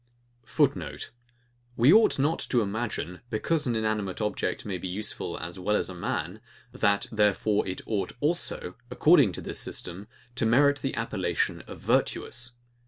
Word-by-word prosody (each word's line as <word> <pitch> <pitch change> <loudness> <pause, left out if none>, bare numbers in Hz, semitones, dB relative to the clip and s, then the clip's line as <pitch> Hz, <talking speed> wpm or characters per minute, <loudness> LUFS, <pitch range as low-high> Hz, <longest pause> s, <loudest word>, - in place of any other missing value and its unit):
[Footnote: - - 0 0.7
We 125 +6 +7
ought 220 +1 +5
not 150 +4 +1
to 120 - +3
imagine, 100 -4 -3
because 150 +7 0
an 120 - +1
inanimate 110 -4 -1
object 105 -2 -2
may 95 -3 -3
be 95 - -4
useful 105 +4 -3
as 85 +3 -6
well 105 +3 +1
as - - 0
a - - -6
man, 85 - -3 0.3
that 100 0 +1
therefore 105 -1 +2
it 95 - -4
ought 100 -4 -2
also, 165 +5 -1 0.2
according - - +5
to - - -6
this - - -4
system, 90 +4 -5 0.3
to 120 -2 0
merit 140 +4 +4
he 135 0 -2
appellation 100 -6 -1
of - - -9
VIRTUOUS. 125 0 0
110 Hz, 155 wpm, -27 LUFS, 95-125 Hz, 0.7 s, We